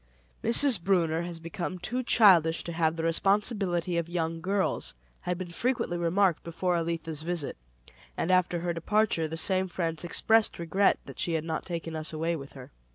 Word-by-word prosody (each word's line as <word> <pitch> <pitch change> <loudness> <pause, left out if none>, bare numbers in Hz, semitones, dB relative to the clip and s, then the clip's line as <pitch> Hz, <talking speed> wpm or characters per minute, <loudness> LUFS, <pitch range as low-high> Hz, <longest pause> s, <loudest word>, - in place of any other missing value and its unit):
"Mrs. 235 -4 +4
Brunner 170 -4 +2
has 170 -1 -6
become 175 +2 -5
too 240 +8 -3
childish 180 -9 +5
to 170 - -5
have 165 -1 +1
the 165 - -4
responsibility 185 0 +1
of 170 0 -2
young 165 -1 -2
girls," 195 - -1 0.2
had 180 0 -3
been 180 -1 -6
frequently 240 -2 -1
remarked 175 +1 +2
before 175 +2 -1
Elitha's 165 -2 -3
visit; 170 -3 -3 0.6
and 180 - 0
after 180 -2 +2
her 175 0 -1
departure, 170 -1 +1
the 160 +1 -6
same 190 +2 +1
friends 165 -2 -3
expressed 220 +5 +2
regret 180 +4 +2
that - - -11
she 170 - 0
had 160 -1 0
not 160 -1 -3
taken 165 -2 -4
us 155 0 -3
away 165 +2 -1
with 140 -3 -9
her. 130 -2 -11
170 Hz, 175 wpm, -28 LUFS, 165-190 Hz, 0.6 s, childish